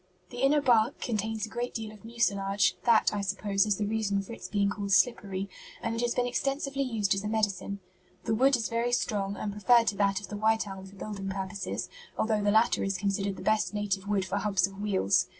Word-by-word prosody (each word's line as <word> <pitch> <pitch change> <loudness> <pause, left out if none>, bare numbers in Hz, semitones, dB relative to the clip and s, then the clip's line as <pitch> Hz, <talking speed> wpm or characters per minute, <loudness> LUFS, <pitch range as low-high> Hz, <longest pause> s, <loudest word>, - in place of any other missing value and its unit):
The 245 - -6
inner 285 +2 +4
bark 240 -1 +3
contains 220 -1 -2
a - - -11
great 240 +2 -4
deal 220 -2 -4
of 215 0 -15
mucilage 200 -4 +1
that, 230 -2 +4
I 205 - -1
suppose, 200 +1 0
is 205 -2 +1
the 210 - -1
reason 205 -2 0
for 215 - -9
its - - -8
being 200 -1 +1
called 200 -1 -4
'slippery' 195 -3 +2 0.3
and 230 - -2
it 230 - -2
has 240 0 0
been 245 - +1
extensively 275 +2 -1
used 220 -7 +1
as 195 0 -2
a - - -2
medicine. 200 -2 -1 0.4
The 225 - 0
wood 265 +5 +4
is 230 -3 -1
very 235 +1 -1
strong 200 -5 0
and 205 - -3
preferred 230 +4 +4
to 200 - -5
that 195 -1 +2
of 205 - -10
the 210 - -5
white 220 +1 +2
elm 190 -1 -8
for 195 - -14
building 195 -1 -5
purposes, 195 0 -4 0.3
although 220 -1 +1
the 205 - +2
latter 220 +3 +3
is 195 -1 -1
considered 200 0 -1
the - - -9
best 215 -1 +1
native 200 -1 -2
wood 200 -2 +1
for 190 +1 -2
hubs 195 -2 +2
of 195 +1 -8
wheels. 195 - +2
210 Hz, 225 wpm, -29 LUFS, 195-230 Hz, 0.4 s, inner